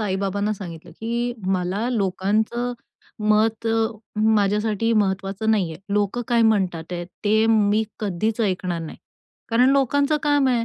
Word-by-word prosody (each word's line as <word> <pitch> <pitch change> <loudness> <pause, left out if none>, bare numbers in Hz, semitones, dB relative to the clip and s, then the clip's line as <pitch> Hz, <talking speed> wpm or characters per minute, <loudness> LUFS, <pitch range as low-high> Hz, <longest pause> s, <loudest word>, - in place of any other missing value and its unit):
आई 195 -3 -1
बाबांना 200 +2 -1
सांगितलं 175 -6 -8
की 235 +2 -1
मला 190 +5 0
लोकांचं 220 +3 0 0.6
मत 215 +1 +2
अ, 225 0 +2 0.4
माझ्यासाठी 215 +1 +2
महत्वाचं 195 0 0
नाही 195 -7 +1
आहे. 160 - -11
लोकं 210 +4 0
काय 235 -1 +3
म्हणतात 185 -7 +1
आहेत 175 -1 -4 0.2
ते 220 +2 +3
मी 215 -1 +3 0.2
कधीच 215 +3 -1
ऐकणार 185 -4 -1
नाही 160 - -8 0.5
कारण 245 +3 +4
लोकांचं 280 +2 +2
काम 290 -2 +3
आहे 240 -2 +1
215 Hz, 140 wpm, -23 LUFS, 195-230 Hz, 0.6 s, कारण